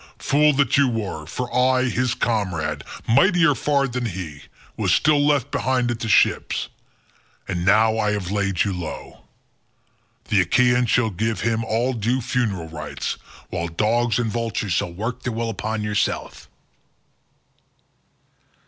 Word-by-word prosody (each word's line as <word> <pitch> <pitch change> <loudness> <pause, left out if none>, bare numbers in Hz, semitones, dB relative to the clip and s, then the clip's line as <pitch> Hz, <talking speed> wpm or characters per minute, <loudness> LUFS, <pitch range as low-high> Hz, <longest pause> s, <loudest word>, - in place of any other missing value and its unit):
Fool 150 +2 +3
that 140 -1 +2
you 140 -1 +4
were: 100 -10 -4
for 125 +8 -5
I, 130 0 +3
his 125 0 0
comrade, 85 - -1 0.2
mightier 175 - +4
far 140 -2 +1
than 125 -1 -3
he, 85 -7 -6 0.3
was - - 0
still 150 -1 +3
left 145 -2 +1
behind 125 -2 0
him - - -1
at - - -13
the 110 - -3
ships, - - +2 0.8
and 85 -3 -2
now 110 +3 +4
I 105 -1 +1
have 95 -3 -3
laid 100 -3 +1
you 100 - -2
low. 80 -8 -7 1.0
The 100 -3 +4
Achaeans 125 +6 +3
shall 115 -2 +2
give 110 +4 -2
him 115 0 0
all 115 +4 0
due 120 +3 0
funeral 110 -9 -2
rites, 75 -2 -5 0.3
while 85 0 -2
dogs 110 +7 +1
and 115 -3 -1
vultures 115 -4 -2
shall 85 - -1
work 110 +8 -4
their 125 - -3
will 115 0 -2
upon 110 +1 -3
yourself." 105 -1 -2
115 Hz, 150 wpm, -22 LUFS, 95-125 Hz, 1.0 s, you